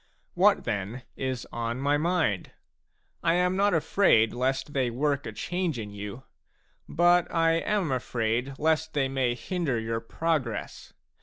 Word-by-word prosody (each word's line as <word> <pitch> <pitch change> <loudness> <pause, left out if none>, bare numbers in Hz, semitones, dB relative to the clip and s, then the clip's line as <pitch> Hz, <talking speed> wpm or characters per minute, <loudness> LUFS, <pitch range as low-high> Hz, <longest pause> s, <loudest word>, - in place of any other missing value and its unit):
What, 200 +3 +4
then, 110 +3 -3
is 130 -2 -3
on 115 0 -3
my 140 +2 +2
mind? 160 - 0 0.7
I 165 0 +2
am 180 +1 +2
not 200 -1 +3
afraid 155 - +3
lest 130 +3 -1
they 130 -3 +1
work 140 +3 -1
a - - -4
change 175 -5 -2
in 105 -2 -6
you; 105 +5 -7 0.7
but 175 +1 +3
I 165 -1 +3
am 190 -3 0
afraid 125 +1 -1
lest 160 +1 +1
they 140 -2 +1
may 130 -2 0
hinder 150 -3 -2
your 115 0 -2
progress. 130 -1 -3
135 Hz, 145 wpm, -27 LUFS, 120-165 Hz, 0.7 s, What